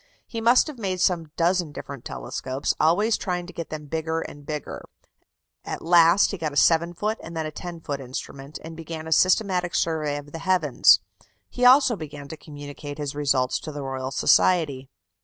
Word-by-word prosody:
He 230 - -6
must 240 +3 +5
have 300 -6 -8
made 190 -4 -2
some 170 -4 +1
dozen 175 -1 +1
different 140 -3 -8
telescopes, 130 - -3
always 205 +8 +3
trying 180 -2 -3
to 180 - -11
get 170 - -6
them 155 -1 -6
bigger 160 +2 -2
and 145 -2 -9
bigger; 150 -2 -5 0.8
at - - -6
last 170 +2 +5
he 200 - -5
got 155 -2 -2
a 145 - -5
7 170 +5 +3
foot 215 +5 -2
and 165 0 -8
then 160 - -2
a 155 - -4
10 170 +1 -8
foot 140 -3 -4
instrument, 135 +2 -7
and 160 0 -8
began 160 0 -7
a 160 - -7
systematic 185 +1 +2
survey 155 -3 0
of 145 0 -9
the 165 - -6
heavens; 165 -7 +4 0.5
he 250 - 0
also 260 -1 +6
began 145 -5 -8
to 160 - -6
communicate 145 -1 -9
his 145 -2 -4
results 140 -3 +1
to 155 - -7
the 145 -1 -6
Royal 130 -1 -4
Society. 140 -1 +2
160 Hz, 190 wpm, -24 LUFS, 145-180 Hz, 0.8 s, also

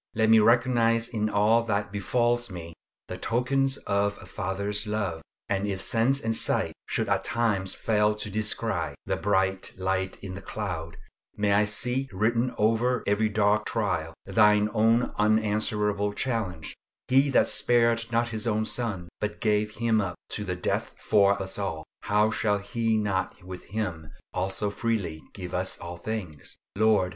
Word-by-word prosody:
Let 110 0 +3
me 110 - +8
recognise 115 0 +3
in 110 -2 -1
all 105 +3 +3
that 100 -2 -1
befalls 120 +4 0
me 85 -3 -8 0.3
the - - -6
tokens 135 +3 +1
of 100 0 0
a - - -11
Father's 100 +3 -3
love; 100 -6 -2 0.3
and 100 0 -1
if 95 -2 -2
sense 120 +7 +1
and 115 -3 -1
sight - - 0
should - - -1
at - - +1
times 105 -5 0
fail 105 -1 +2
to 105 0 -5
descry 110 +1 -1
"the - - 0
bright 95 -1 0
light 95 0 -1
in 95 -2 -6
the 95 - -7
cloud," 85 -6 -5 0.4
may 105 -1 +1
I 105 +1 +4
see 125 +5 0
written 115 +5 +1
over 115 +3 +2
every 105 +2 +2
dark 105 0 +2
trial - - -1
Thine 105 -1 +4
own 115 +3 +3
unanswerable 105 -1 +1
challenge, 105 - -3 0.3
"He 135 +2 +4
that 135 - +4
spared 115 -1 +3
not 120 +1 +1
his 110 0 -3
own 110 -1 +1
Son, 110 -8 -2
but 105 - -3
gave 105 -1 +1
Him 115 -1 +2
up 90 -3 -3
to 105 - -4
the 90 -2 -3
death 90 - -2
for 100 -1 +3
us 95 +1 -5
all, 85 -6 -3 0.2
how 105 +1 +3
shall 105 -1 +1
He 110 +2 -1
not 100 -2 -2
with 90 0 -9
Him 90 -8 -4 0.2
also 95 +3 -2
freely 100 -9 -2
give 90 -3 -7
us 95 +1 -1
all 85 +1 -7
things?" 90 -6 -6 0.2
Lord! 105 -3 +3
105 Hz, 160 wpm, -27 LUFS, 95-115 Hz, 0.4 s, me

